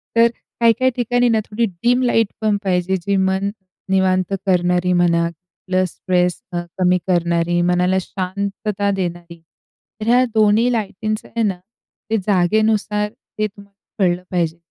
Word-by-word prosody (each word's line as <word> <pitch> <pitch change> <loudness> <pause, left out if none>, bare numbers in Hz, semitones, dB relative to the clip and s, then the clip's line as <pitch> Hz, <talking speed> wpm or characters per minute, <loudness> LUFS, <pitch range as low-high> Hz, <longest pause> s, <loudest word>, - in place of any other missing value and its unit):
तर 230 0 +6 0.3
काही-काही 235 +3 +3
ठिकाणी 245 0 +1
ना 225 -1 +3
थोडी 230 +2 0 0.2
डिम 245 +1 +3
लाईटपण 220 -3 +1
पाहिजे 185 -1 +1
जी 200 +3 -1
मन 190 +1 +1 0.4
निवांत 190 0 +2
करणारी 180 0 +2
म्हणा, 170 -1 +3 0.4
प्लस 185 0 +1
स्ट्रेस 180 -1 0
अ, 175 - -1 0.2
कमी 180 0 +4
करणारी, 175 -1 +1
मनाला 180 +1 +2
शांतता 200 +2 -3
देणारी. 175 -3 -4 0.6
तर 215 - -3
ह्या 245 +2 +5
दोन्ही 220 +3 +4
लाईटींचं 215 0 -3
आहे 230 - -1
ना, 195 -4 0 0.5
ते 225 - +2
जागेनुसार 210 +2 +2
ते 215 -2 -5
तुम्हाला 200 0 -17 0.3
कळलं 180 0 0
पाहिजे, 170 -3 0
190 Hz, 135 wpm, -19 LUFS, 180-215 Hz, 0.6 s, तर